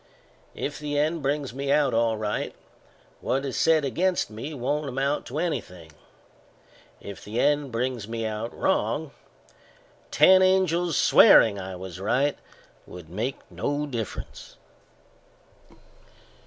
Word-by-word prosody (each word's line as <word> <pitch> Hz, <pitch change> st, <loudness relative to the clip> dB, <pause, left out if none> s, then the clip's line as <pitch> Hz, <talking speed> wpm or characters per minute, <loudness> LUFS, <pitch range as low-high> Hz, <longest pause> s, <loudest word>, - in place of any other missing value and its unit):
If 145 Hz, -, -4 dB
the 145 Hz, -1 st, -3 dB
end 155 Hz, +2 st, 0 dB
brings 140 Hz, -2 st, -2 dB
me 140 Hz, +1 st, -3 dB
out 145 Hz, -2 st, +3 dB
all 115 Hz, -1 st, +1 dB
right, 105 Hz, -1 st, -3 dB, 0.6 s
what 135 Hz, +1 st, -1 dB
is 135 Hz, -, -4 dB
said 160 Hz, -3 st, +3 dB
against 175 Hz, -1 st, 0 dB
me 115 Hz, +8 st, -6 dB
won't 145 Hz, +2 st, -2 dB
amount 135 Hz, +3 st, -1 dB
to 135 Hz, -, -6 dB
anything; 90 Hz, -, -4 dB, 1.1 s
if 100 Hz, -1 st, -10 dB
the 110 Hz, +3 st, -4 dB
end 145 Hz, -1 st, +1 dB
brings 120 Hz, -2 st, -2 dB
me 115 Hz, 0 st, -4 dB
out 110 Hz, +2 st, -4 dB
wrong, -, -, -1 dB, 1.0 s
ten 185 Hz, 0 st, +6 dB
angels 180 Hz, -3 st, +2 dB
swearing 100 Hz, -3 st, +6 dB
I 95 Hz, 0 st, -6 dB
was 90 Hz, -1 st, -8 dB
right 125 Hz, +9 st, +1 dB, 0.5 s
would 85 Hz, -3 st, -11 dB
make 115 Hz, +8 st, -3 dB
no 145 Hz, +1 st, -2 dB
difference." 115 Hz, -8 st, -7 dB
135 Hz, 125 wpm, -25 LUFS, 110-150 Hz, 1.1 s, ten